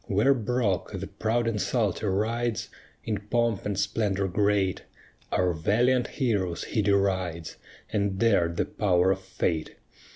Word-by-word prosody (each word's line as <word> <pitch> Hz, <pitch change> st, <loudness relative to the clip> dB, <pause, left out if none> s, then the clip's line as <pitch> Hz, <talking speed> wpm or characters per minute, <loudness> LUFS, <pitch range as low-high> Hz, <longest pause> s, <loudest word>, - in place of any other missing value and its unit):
Where 105 Hz, +8 st, +3 dB
Brock, 115 Hz, -5 st, -1 dB
the 95 Hz, 0 st, -4 dB
proud 110 Hz, +4 st, -1 dB
insulter, 105 Hz, -1 st, 0 dB
rides 115 Hz, +3 st, -1 dB, 0.3 s
In 105 Hz, -3 st, -2 dB
pomp 115 Hz, -4 st, +1 dB
and 100 Hz, -2 st, -2 dB
splendor 100 Hz, -2 st, 0 dB
great; 100 Hz, 0 st, +1 dB, 0.5 s
Our 90 Hz, -1 st, +2 dB
valiant 120 Hz, +10 st, +2 dB
heroes 100 Hz, -, -1 dB
he 110 Hz, -, -1 dB
derides, 95 Hz, -5 st, 0 dB, 0.4 s
And 100 Hz, -2 st, 0 dB
dared 90 Hz, -6 st, +2 dB
the -, -, +1 dB
power 95 Hz, -2 st, +2 dB
of 95 Hz, -, 0 dB
fate. 85 Hz, -4 st, -2 dB
100 Hz, 130 wpm, -27 LUFS, 95-115 Hz, 0.5 s, Where